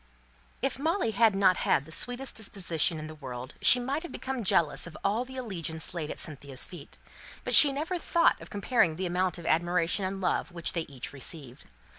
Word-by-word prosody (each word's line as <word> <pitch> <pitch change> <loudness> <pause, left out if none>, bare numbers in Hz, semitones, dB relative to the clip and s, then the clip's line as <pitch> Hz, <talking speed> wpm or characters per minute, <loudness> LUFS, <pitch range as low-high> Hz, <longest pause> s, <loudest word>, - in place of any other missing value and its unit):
If - - -1
Molly 320 - 0
had 220 0 +3
not 190 -2 +3
had 140 - +1
the 160 - -14
sweetest 245 +8 0
disposition 180 -6 -1
in 155 - -7
the 155 - -9
world 130 -3 -8
she 250 - +7
might 270 +5 -3
have 345 - -9
become 260 -2 -5
jealous 170 -4 +1
of 160 - -11
all 215 +5 0
the 260 +1 -11
allegiance 170 - -4
laid 160 -4 -4
at - - -6
Cynthia's 140 -4 +1
feet; 165 -4 -12 0.5
but - - -1
she 290 - +10
never 320 +6 -3
thought 335 0 +2
of - - -11
comparing 200 -5 +1
the 185 +3 -4
amount 180 +1 -1
of 170 - -10
admiration 175 +3 0
and 190 +1 -3
love 180 0 -1
which 170 0 -1
they 170 -3 -3
each 135 -1 -7
received. 140 -2 -5
180 Hz, 200 wpm, -28 LUFS, 160-245 Hz, 0.5 s, she